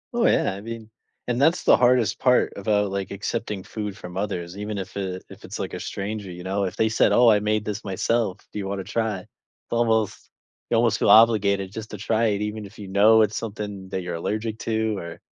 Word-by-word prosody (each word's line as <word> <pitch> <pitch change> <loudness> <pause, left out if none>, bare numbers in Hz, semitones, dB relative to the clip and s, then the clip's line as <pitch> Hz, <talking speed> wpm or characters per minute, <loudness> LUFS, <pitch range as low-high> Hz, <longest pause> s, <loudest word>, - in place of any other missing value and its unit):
Oh 235 - +2
yeah, - - +2
I 100 - -8
mean 115 -1 -7 0.4
and 120 +2 0
that's 165 +4 +3
the - - +6
hardest 120 -4 +3
part 125 -1 +3
about, 105 0 +1
like, 100 -1 -3
accepting 100 0 -4
food 105 -3 -5
from 90 -2 -9
others, 95 -3 -3
even 105 0 -4
if 95 +1 -6
it 95 -2 -4
if - - -12
it's, - - -6
like - - -4
a - - -4
stranger, 100 0 -5
you 90 0 -8
know, 100 +1 -1
if 95 +2 -4
they 110 0 +2
said, 110 - +3
"Oh, 120 -1 +6
I 105 - +5
made 105 0 0
this 105 0 -4
myself, 100 +1 0
do - - -5
you 95 - -4
wanna 100 -1 -3
try?" 105 -2 -2 0.5
Almost 110 -3 0 0.4
you 115 - +2
almost 115 -2 +2
feel - - +2
obligated 100 -4 +5
just 110 +1 -7
to 105 - -6
try 110 +3 +1
it, 105 -1 0
even 105 0 -4
if 100 - -14
you 100 - -8
know 105 +3 +5
it's 105 0 -1
something 105 -3 -6
that 95 - -3
you're 85 -1 -4
allergic 110 +5 -3
to, 110 -2 -1
or 85 -2 -7
105 Hz, 225 wpm, -24 LUFS, 95-110 Hz, 0.5 s, the